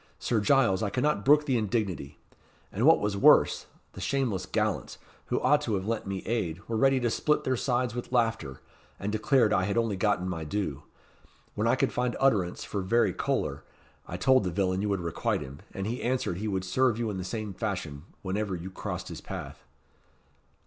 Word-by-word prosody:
Sir 115 Hz, -, 0 dB
Giles, 100 Hz, -5 st, +3 dB
I 105 Hz, -, 0 dB
cannot 125 Hz, -1 st, 0 dB
brook 150 Hz, +2 st, +5 dB
the 130 Hz, -5 st, +1 dB
indignity. 100 Hz, -9 st, -2 dB, 0.5 s
And 115 Hz, +8 st, +1 dB
what 160 Hz, -, +7 dB
was 105 Hz, -1 st, -1 dB
worse, 100 Hz, -, +5 dB, 0.3 s
the -, -, -9 dB
shameless 115 Hz, -10 st, -1 dB
gallants, 105 Hz, 0 st, -1 dB, 0.3 s
who -, -, 0 dB
ought 150 Hz, 0 st, +3 dB
to 110 Hz, -7 st, -1 dB
have 95 Hz, 0 st, -3 dB
lent 110 Hz, -1 st, -2 dB
me 95 Hz, -1 st, -4 dB
aid, 95 Hz, -8 st, -1 dB
were 115 Hz, -, -2 dB
ready 135 Hz, +3 st, +4 dB
to 120 Hz, -, +1 dB
split 150 Hz, +5 st, +1 dB
their 130 Hz, -, +1 dB
sides 125 Hz, -1 st, 0 dB
with 120 Hz, 0 st, -6 dB
laughter, 115 Hz, -, 0 dB, 0.4 s
and 100 Hz, -, -2 dB
declared 110 Hz, +1 st, +3 dB
I 95 Hz, -, +2 dB
had 100 Hz, +3 st, -1 dB
only 115 Hz, -3 st, +1 dB
gotten 95 Hz, -2 st, +1 dB
my 85 Hz, -3 st, -3 dB
due. 80 Hz, -4 st, -3 dB, 0.7 s
When -, -, 0 dB
I -, -, +4 dB
could -, -, 0 dB
find 125 Hz, -1 st, 0 dB
utterance 105 Hz, -10 st, +2 dB
for 100 Hz, -, -3 dB
very 110 Hz, 0 st, +2 dB
choler, -, -, -2 dB, 0.4 s
I 90 Hz, -, -5 dB
told 130 Hz, +6 st, +4 dB
the 90 Hz, -, -1 dB
villain 95 Hz, +1 st, 0 dB
you 105 Hz, -, -1 dB
would 100 Hz, -2 st, 0 dB
requite 85 Hz, -1 st, -1 dB
him, 70 Hz, +2 st, -8 dB
and 95 Hz, -, -4 dB
he 120 Hz, +4 st, -3 dB
answered 125 Hz, -8 st, -1 dB
he 105 Hz, +3 st, -3 dB
would 95 Hz, -2 st, -1 dB
serve 125 Hz, +3 st, +2 dB
you 115 Hz, -2 st, -1 dB
in 95 Hz, -, -4 dB
the -, -, -3 dB
same 105 Hz, +2 st, -4 dB
fashion, 90 Hz, -8 st, -4 dB, 0.2 s
whenever 100 Hz, 0 st, -2 dB
you 90 Hz, +2 st, -7 dB
crossed -, -, -5 dB
his -, -, -7 dB
path." -, -, -7 dB
105 Hz, 200 wpm, -28 LUFS, 95-120 Hz, 0.7 s, what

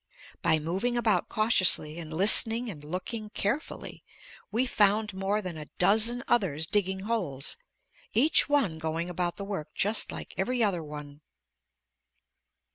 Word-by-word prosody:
By 160 Hz, -2 st, +3 dB
moving 190 Hz, +11 st, -2 dB
about 230 Hz, -3 st, +1 dB
cautiously 185 Hz, -7 st, +2 dB
and 160 Hz, -2 st, -8 dB
listening 225 Hz, +6 st, +4 dB
and 150 Hz, -5 st, -10 dB
looking 200 Hz, +7 st, -5 dB
carefully, 230 Hz, +8 st, -4 dB, 0.5 s
we 235 Hz, +5 st, +1 dB
found 210 Hz, -2 st, +2 dB
more 195 Hz, +3 st, -1 dB
than 175 Hz, -4 st, -6 dB
a 150 Hz, -, -8 dB
dozen 225 Hz, +6 st, +3 dB
others 165 Hz, -10 st, 0 dB
digging 190 Hz, +1 st, 0 dB
holes, 185 Hz, -, -2 dB, 0.6 s
each 290 Hz, +6 st, +3 dB
one 230 Hz, -, +1 dB
going 165 Hz, +2 st, -3 dB
about 175 Hz, 0 st, -2 dB
the 200 Hz, -, -6 dB
work 195 Hz, -7 st, -6 dB
just 210 Hz, +3 st, +2 dB
like -, -, -8 dB
every 245 Hz, +5 st, 0 dB
other 190 Hz, -5 st, 0 dB
one. 150 Hz, -1 st, -10 dB
195 Hz, 135 wpm, -28 LUFS, 165-225 Hz, 0.6 s, listening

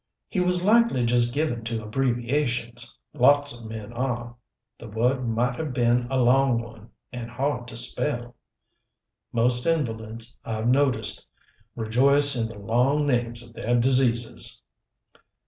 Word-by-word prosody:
"He 190 Hz, -, -3 dB
was 180 Hz, 0 st, +1 dB
likely 225 Hz, -, +3 dB
just 120 Hz, 0 st, +2 dB
given 135 Hz, -4 st, -2 dB
to 115 Hz, -1 st, -4 dB
abbreviations. 120 Hz, 0 st, -1 dB, 0.2 s
Lots 145 Hz, 0 st, +3 dB
of 115 Hz, -, -10 dB
men 110 Hz, 0 st, -8 dB
are. 120 Hz, -1 st, -4 dB, 0.4 s
The -, -, -10 dB
word 120 Hz, +4 st, -1 dB
might 120 Hz, +2 st, -1 dB
have 155 Hz, -4 st, -4 dB
been 120 Hz, 0 st, +1 dB
a 135 Hz, -1 st, 0 dB
long 125 Hz, 0 st, +3 dB
one, 115 Hz, -1 st, -11 dB, 0.2 s
and 120 Hz, -1 st, -6 dB
hard 125 Hz, 0 st, -3 dB
to 115 Hz, -, -6 dB
spell." 120 Hz, -1 st, -1 dB, 1.0 s
"Most 120 Hz, +3 st, +1 dB
invalids, 115 Hz, -6 st, -2 dB
I've 110 Hz, 0 st, -3 dB
noticed, 130 Hz, +1 st, +1 dB, 0.5 s
rejoice 135 Hz, +5 st, +5 dB
in 115 Hz, -2 st, -1 dB
the 110 Hz, -, -11 dB
long 125 Hz, +8 st, +1 dB
names 120 Hz, -3 st, -1 dB
of 115 Hz, -, -18 dB
their 120 Hz, +1 st, 0 dB
diseases!" 120 Hz, -2 st, +2 dB
120 Hz, 135 wpm, -24 LUFS, 115-135 Hz, 1.0 s, rejoice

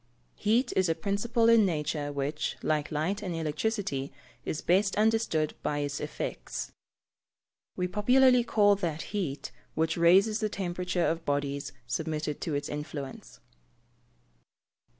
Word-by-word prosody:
_ -, -, -42 dB, 0.3 s
Heat 225 Hz, +5 st, +1 dB
is 185 Hz, -2 st, +3 dB
a 165 Hz, -, +2 dB
principle 205 Hz, +6 st, +1 dB
in 230 Hz, -1 st, +7 dB
nature 150 Hz, -4 st, -1 dB
which, 145 Hz, +2 st, -2 dB
like 150 Hz, -1 st, 0 dB
light 160 Hz, +7 st, -1 dB
and 180 Hz, -4 st, -3 dB
electricity, 155 Hz, -2 st, -2 dB, 0.3 s
is 155 Hz, -, -3 dB
best 195 Hz, +3 st, +3 dB
understood 215 Hz, -8 st, +2 dB
by 145 Hz, -, -1 dB
its 145 Hz, -1 st, -2 dB
effects. -, -, -5 dB, 1.0 s
We 180 Hz, -, -1 dB
popularly 250 Hz, +5 st, +4 dB
call 205 Hz, -3 st, +4 dB
that 165 Hz, -5 st, -2 dB
heat, 170 Hz, -9 st, -3 dB, 0.2 s
which 160 Hz, +1 st, 0 dB
raises 195 Hz, +6 st, +5 dB
the 215 Hz, -, 0 dB
temperature 180 Hz, -2 st, -1 dB
of 165 Hz, 0 st, -1 dB
bodies 140 Hz, -1 st, -2 dB
submitted 150 Hz, +3 st, -3 dB
to 155 Hz, -, -2 dB
its 145 Hz, -, -2 dB
influence. 145 Hz, -2 st, -7 dB
170 Hz, 130 wpm, -29 LUFS, 150-205 Hz, 1.0 s, in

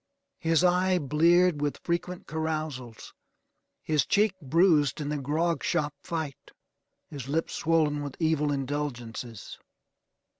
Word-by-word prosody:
His 165 Hz, +1 st, +2 dB
eye 180 Hz, +1 st, +3 dB
bleared 165 Hz, +2 st, +3 dB
with 145 Hz, -1 st, -1 dB
frequent 175 Hz, +1 st, -2 dB
carousals. 155 Hz, -7 st, -4 dB, 0.7 s
His 150 Hz, -4 st, +2 dB
cheek 205 Hz, -, +2 dB
bruised 155 Hz, -1 st, +3 dB
in 145 Hz, -1 st, -3 dB
the 150 Hz, -1 st, -2 dB
grog 160 Hz, +5 st, 0 dB
shop 155 Hz, -4 st, 0 dB
fight. 160 Hz, -5 st, -5 dB, 0.6 s
His 140 Hz, -4 st, -7 dB
lip 160 Hz, +4 st, -1 dB
swollen 155 Hz, -3 st, +1 dB
with 145 Hz, -2 st, -6 dB
evil 155 Hz, -3 st, +1 dB
indulgences. 125 Hz, -6 st, -4 dB
155 Hz, 115 wpm, -28 LUFS, 145-170 Hz, 0.7 s, eye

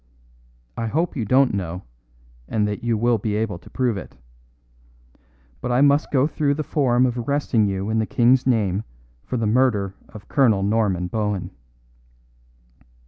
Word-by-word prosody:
I 115 Hz, -, -3 dB
hope 160 Hz, +9 st, -1 dB
you 120 Hz, -6 st, -2 dB
don't 130 Hz, +3 st, +3 dB
know, 90 Hz, -2 st, -4 dB, 0.6 s
and 105 Hz, -2 st, 0 dB
that 105 Hz, +1 st, -4 dB
you 115 Hz, -2 st, +1 dB
will 120 Hz, +1 st, +2 dB
be 105 Hz, +1 st, -2 dB
able 105 Hz, -5 st, -2 dB
to -, -, -16 dB
prove 125 Hz, -5 st, -1 dB
it. 95 Hz, -, -10 dB, 1.4 s
But -, -, -3 dB
I 125 Hz, +2 st, +3 dB
must 145 Hz, +1 st, +3 dB
go 135 Hz, -1 st, +2 dB
through 145 Hz, -2 st, 0 dB
the 155 Hz, -, -3 dB
form 130 Hz, -4 st, +2 dB
of 125 Hz, -1 st, -1 dB
arresting 120 Hz, -4 st, +1 dB
you 100 Hz, +2 st, -2 dB
in 110 Hz, -, +1 dB
the 110 Hz, -, -1 dB
King's 125 Hz, +2 st, +3 dB
name 105 Hz, -5 st, +1 dB, 0.4 s
for 125 Hz, -, -4 dB
the 115 Hz, -, -1 dB
murder 105 Hz, -4 st, +1 dB, 0.2 s
of 105 Hz, -2 st, -12 dB
Colonel 115 Hz, -9 st, +3 dB
Norman 100 Hz, -4 st, +1 dB
Bohun." 105 Hz, 0 st, -2 dB
115 Hz, 160 wpm, -22 LUFS, 105-130 Hz, 1.4 s, don't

